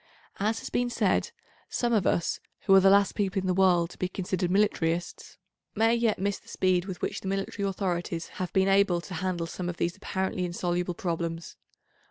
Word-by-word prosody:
As 215 +3 +1
has - - -7
been 245 0 +1
said, - - +1 0.4
some 240 -1 0
of 205 -5 +2
us, 170 - +1 0.2
who 195 - +3
are 195 - +9
the 195 0 +5
last 200 0 +4
people 195 -2 0
in 190 - -4
the 185 - +2
world 180 -2 +3
to - - -14
be 185 - -1
considered 180 -1 -2
militarists, 175 -4 0 0.4
may 225 +2 +3
yet 235 -2 +2
miss 200 +1 -1
the - - -27
speed 185 -1 +1
with 190 -2 -7
which - - -2
the - - -6
military 195 +1 -2
authorities 175 -3 -2
have 180 - -2
been 190 0 +3
able 195 -2 +4
to 180 - -9
handle 180 -1 -2
some 175 +1 -4
of 175 - -5
these 170 0 -1
apparently 190 -1 -2
insoluble 175 0 -2
problems. 165 -1 -3
185 Hz, 200 wpm, -28 LUFS, 175-195 Hz, 0.4 s, are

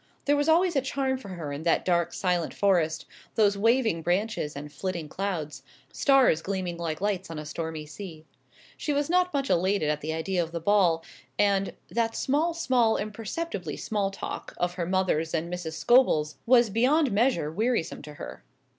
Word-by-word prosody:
There 290 - +4
was 290 +2 +1
always 340 +1 +4
a 275 - +3
charm 265 0 -1
for 215 - -11
her 165 -6 -5
in 140 - -5
that 165 0 +1
dark 170 -2 +2
silent 180 -3 -1
forest, 170 -5 +1 0.3
those 205 -2 +4
waving 225 -4 +2
branches 175 -2 -1
and 145 +1 -8
flitting 170 0 -4
clouds, 170 -4 -4 0.3
stars 270 - +4
gleaming 185 -3 -3
like 165 -1 -4
lights 195 -3 -1
on 165 - -6
a 150 - -6
stormy 160 0 -5
sea. 160 -1 -9 0.5
She 295 - -1
was 285 +2 0
not 360 0 +3
much 275 -3 -1
elated 185 -4 +2
at 150 0 -3
the 155 - -3
idea 165 +3 -1
of 165 0 -5
the 170 - -2
ball, 170 -3 +3 0.3
and 200 -1 +2 0.2
"that 225 -1 0
small, 315 +5 +1
small, 250 -8 +2
imperceptibly 215 - -4
small 205 -3 -1
talk" 195 - -7
of 175 0 -1
her 175 -2 -3
mother's 180 -4 0
and 170 +2 -2
Mrs. 175 -3 -4
Scobel's 160 -7 +3
was 240 -3 +5
beyond 265 +6 +3
measure 210 - +1
wearisome 220 -1 -1
to 150 0 -10
her. - - -9
190 Hz, 180 wpm, -27 LUFS, 165-240 Hz, 0.5 s, was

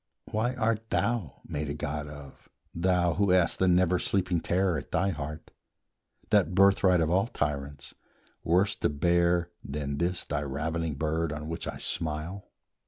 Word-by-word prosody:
Why 120 +4 0
art 115 -2 -1
thou 115 - -1
made 75 0 -4
a 70 - -3
god 75 0 -3
of, 75 -2 -12 0.2
thou, 90 0 +2
who 100 +4 +1
hast 90 -2 +3
The 95 - +3
never 90 0 +3
sleeping 90 -3 0
terror 90 +1 +1
at 75 - -6
thy 95 - +1
heart, 75 -2 -6 0.8
That 90 -4 +3
birthright 95 -2 +5
of 80 0 +1
all 95 +5 +3
tyrants, 70 - -4 0.5
worse 90 +5 +2
to - - +1
bear 85 +3 +2
Than 70 0 -4
this 90 +1 -1
thy 75 0 -2
ravening 80 +3 -2
bird 80 +2 -1
on 75 +2 -5
which 80 - -4
I - - -4
smile? 80 +4 -3
85 Hz, 160 wpm, -28 LUFS, 75-95 Hz, 0.8 s, birthright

